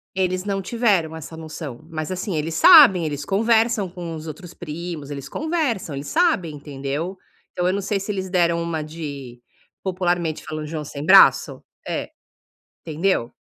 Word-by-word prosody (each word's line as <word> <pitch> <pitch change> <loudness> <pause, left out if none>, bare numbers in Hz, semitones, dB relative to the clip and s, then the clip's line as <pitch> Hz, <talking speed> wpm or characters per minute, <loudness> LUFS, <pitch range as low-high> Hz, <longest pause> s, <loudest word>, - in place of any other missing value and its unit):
eles 185 -1 0
não 195 -1 -2
tiveram 195 -7 +1
essa 160 0 -9
noção, 155 -4 -8
mas, 155 0 -4
assim, 185 0 -3
eles 160 +1 -2
sabem, 255 - +8
eles 145 -2 -3
conversam 225 +2 +2
com 170 -2 -7
os 155 0 -8
outros 170 +3 -9
primos. 160 -2 -7
Eles 140 -1 -7
conversam, 290 - -2
eles 140 +1 -6
sabem, 310 - +1
entendeu. 145 +5 -5 0.4
Então, 180 0 -1
eu 185 - +2
não 200 - -1
sei 200 +1 -1
se 195 +2 -4
eles 190 -2 -4
deram 170 -2 +2
uma 170 -2 -2
de, 145 -6 -8 0.4
popularmente 175 -4 -1
falando, 155 0 -5
"joão 155 0 -4
sem 145 0 -7
braço"? - - +6 0.2
É. - - -3 0.8
Entendeu? 160 -6 0
170 Hz, 160 wpm, -22 LUFS, 155-195 Hz, 0.8 s, sabem